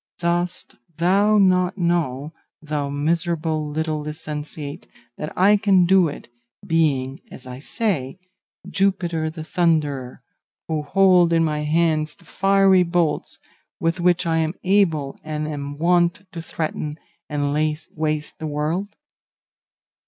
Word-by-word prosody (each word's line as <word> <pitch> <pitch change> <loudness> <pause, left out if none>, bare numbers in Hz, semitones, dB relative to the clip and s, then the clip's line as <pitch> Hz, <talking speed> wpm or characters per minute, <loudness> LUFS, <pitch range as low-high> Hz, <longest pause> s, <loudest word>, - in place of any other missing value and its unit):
Dost 175 +1 -2 0.2
thou 200 +5 +3
not 185 -1 +3
know, 160 -5 -1 0.3
thou 150 -2 -3
miserable 160 +1 -1
little 155 0 -2
licentiate, 150 0 -6 0.3
that 150 - -4
I 200 +3 +5
can 195 -3 +4
do 185 -1 +5
it, 145 - -8 0.4
being, 145 -6 +1
as 130 - -10
I 125 0 -8
say, 170 - -2 0.5
Jupiter 175 -5 0
the 160 0 -7
Thunderer, 150 -7 0 0.4
who 155 -1 -1
hold 180 +2 +4
in 165 0 +3
my 150 -2 0
hands 155 0 +1
the - - -22
fiery 195 -1 +4
bolts 170 -3 0 0.4
with 165 +2 0
which 175 0 +2
I 165 -1 +1
am 160 +1 -1
able 170 -8 +2
and 155 0 -3
am 145 -1 -5
wont 175 +3 +2
to 170 - -6
threaten 155 -2 -4 0.3
and 145 -1 -1
lay 155 0 +1 0.2
waste 155 -1 -2
the 160 - -4
world? 160 +7 -2
160 Hz, 130 wpm, -22 LUFS, 150-180 Hz, 0.5 s, I